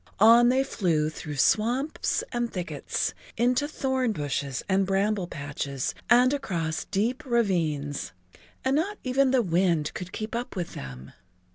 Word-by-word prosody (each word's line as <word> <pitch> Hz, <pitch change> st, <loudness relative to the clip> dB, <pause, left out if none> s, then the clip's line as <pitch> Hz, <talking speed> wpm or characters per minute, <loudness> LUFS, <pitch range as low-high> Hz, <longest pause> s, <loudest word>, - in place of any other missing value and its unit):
On 235 Hz, +3 st, +7 dB
they 260 Hz, +2 st, +3 dB
flew 160 Hz, -, 0 dB
through 150 Hz, -1 st, -7 dB
swamps 240 Hz, -, +1 dB
and 240 Hz, -1 st, -1 dB
thickets, 180 Hz, 0 st, -2 dB, 0.2 s
into 250 Hz, +5 st, +2 dB
thorn 265 Hz, -5 st, 0 dB
bushes 140 Hz, -4 st, -3 dB
and 190 Hz, 0 st, +2 dB
bramble 195 Hz, -1 st, +1 dB
patches 140 Hz, -3 st, -4 dB, 0.2 s
and 250 Hz, +3 st, +6 dB
across 170 Hz, -, -2 dB
deep 230 Hz, +6 st, -1 dB
ravines, 165 Hz, -, 0 dB, 0.5 s
and 265 Hz, +1 st, +2 dB
not 395 Hz, +7 st, 0 dB
even 265 Hz, +1 st, +2 dB
the 255 Hz, -2 st, +3 dB
wind 170 Hz, -4 st, +1 dB
could 180 Hz, 0 st, -6 dB
keep 215 Hz, 0 st, -5 dB
up 240 Hz, -1 st, -4 dB
with 175 Hz, -3 st, -4 dB
them. 65 Hz, 0 st, -9 dB
200 Hz, 140 wpm, -27 LUFS, 155-250 Hz, 0.5 s, On